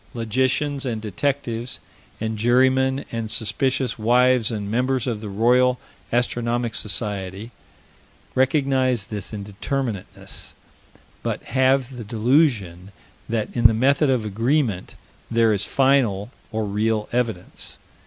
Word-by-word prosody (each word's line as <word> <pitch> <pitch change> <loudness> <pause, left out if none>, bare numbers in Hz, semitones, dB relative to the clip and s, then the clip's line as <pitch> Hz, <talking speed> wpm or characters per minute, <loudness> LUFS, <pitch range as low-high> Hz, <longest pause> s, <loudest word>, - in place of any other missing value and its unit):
Logicians 130 +5 0
and 120 -5 -2
detectives 120 +2 -2 0.4
and 110 0 -2
jurymen 130 +4 +3
and 115 -2 -3
suspicious 125 +4 0
wives 125 +1 +4
and 105 -3 -4
members 125 +1 +1
of 115 -4 -2
the 105 - -6
Royal 125 +5 +3 0.3
Astronomic 120 -1 0
Society 100 +1 -2 0.8
recognize 130 -4 +2
this 105 -3 -5
indeterminateness, 105 +1 -4 0.7
but - - -3
have 130 0 +1
the 120 - -5
delusion 110 - +1 0.4
that 110 -2 -2
in 120 -2 +7
the 110 - 0
method 140 +5 +3
of 125 -4 +1
agreement 115 -1 0 0.3
there 115 -1 +3
is 100 0 -1
final, 130 -6 +2 0.2
or 110 -1 -1
real 105 +1 0
evidence. 115 -7 -2
115 Hz, 115 wpm, -23 LUFS, 105-130 Hz, 0.8 s, in